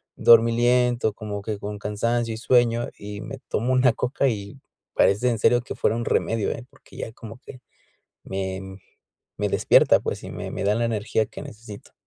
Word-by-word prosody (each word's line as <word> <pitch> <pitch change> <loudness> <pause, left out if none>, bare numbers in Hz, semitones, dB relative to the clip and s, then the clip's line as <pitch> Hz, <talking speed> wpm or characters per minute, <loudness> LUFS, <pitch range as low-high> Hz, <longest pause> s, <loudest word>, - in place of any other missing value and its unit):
dormilento, 120 0 +4
como 105 -1 -6
que 105 0 -4
con 105 0 -5
cansancio 115 +3 -1
y 110 - -6
sueño, 120 0 +2
y 105 0 -8
me 135 +5 -7
tomo 125 +4 0
una 130 -1 +4
Coca 125 +4 0
y 105 +3 -6 0.3
parece 105 +6 +3
en 115 -2 -1
serio 120 +3 +4
que 120 - -7
fuera 115 - +1
un 120 - -3
remedio 115 -2 0
eh, 115 - -6
porque - - -20
ya - - -5
como 115 0 -11
que 125 - -11 0.6
me, 95 0 -5 0.6
me - - -1
despierta, - - +4
pues, - - -4
y - - -7
me - - -6
me - - -4
da 105 +1 +3
la 120 - 0
energía 110 -1 0
que - - -10
necesito. 110 -2 -11
115 Hz, 185 wpm, -24 LUFS, 105-120 Hz, 0.6 s, dormilento